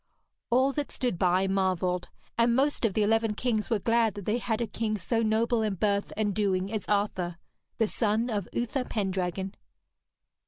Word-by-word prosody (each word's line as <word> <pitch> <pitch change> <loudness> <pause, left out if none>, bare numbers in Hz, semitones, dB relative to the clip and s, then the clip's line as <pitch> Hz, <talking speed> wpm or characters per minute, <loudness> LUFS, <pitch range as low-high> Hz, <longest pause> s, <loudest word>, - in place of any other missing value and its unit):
All 260 +3 +4
that 290 +1 -3
stood 245 -9 -2
by 185 +1 +3
marvelled, 185 -2 0 0.3
and 235 0 +3
most 275 -1 +2
of 205 - 0
the 215 - +3
eleven 225 0 +2
kings 220 -2 -1
were 225 - +2
glad 230 0 +2
that 200 -2 -7
they 220 +3 +1
had 225 -2 -1
a 235 - 0
king 215 -1 -2
so 225 +5 0
noble 225 +1 +2
in 215 -3 0
birth 200 +1 0
and 210 -2 +1
doing 195 0 0
as 215 - -3
Arthur, 190 -4 0 0.4
the 225 - +3
son 220 +1 0
of 205 -6 -2
Uther 245 +2 -1
Pendragon. 190 -3 -2
215 Hz, 180 wpm, -28 LUFS, 195-230 Hz, 0.4 s, All